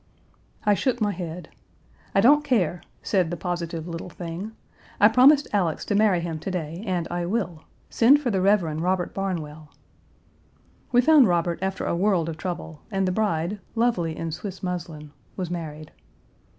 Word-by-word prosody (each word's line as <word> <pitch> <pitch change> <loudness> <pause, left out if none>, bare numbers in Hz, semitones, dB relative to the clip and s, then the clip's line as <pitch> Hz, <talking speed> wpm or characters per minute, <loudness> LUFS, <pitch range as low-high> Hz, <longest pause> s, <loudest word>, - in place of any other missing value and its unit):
I 210 - +5
shook 245 +4 0
my 210 -2 +1
head. 175 -2 -6 0.7
'I 195 - +5
don't 290 +7 +6
care,' 190 - +1 0.2
said 185 -5 +1
the 175 - -4
positive 170 -1 -4
little 170 +1 -6
thing, 175 +5 -6 0.5
'I 210 - +7
promised 275 +5 +6
Alex 180 -6 0
to - - -1
marry 200 -4 +3
him 165 -2 -4
to 175 - -5
day 170 0 -4
and 175 -3 -1
I 175 0 -2
will. 180 -6 -3 0.3
Send 265 +5 +5
for 260 -5 -1
the 190 -2 0
Rev. 200 0 +4 0.2
Robert 180 0 0
Barnwell.' 160 -6 -4 1.2
We 245 0 +5
found 290 -2 +6
Robert 170 -1 0
after 190 0 -2
a - - 0
world 180 -3 +1
of 160 - -6
trouble, 165 -3 -6
and 195 -3 0
the - - +1
bride, 185 -1 -1 0.2
lovely 185 -9 0
in 165 -1 -4
Swiss 190 +4 -7
muslin, 165 -5 -5 0.3
was 180 -3 -3
married. 155 -3 -6
180 Hz, 165 wpm, -25 LUFS, 165-210 Hz, 1.2 s, I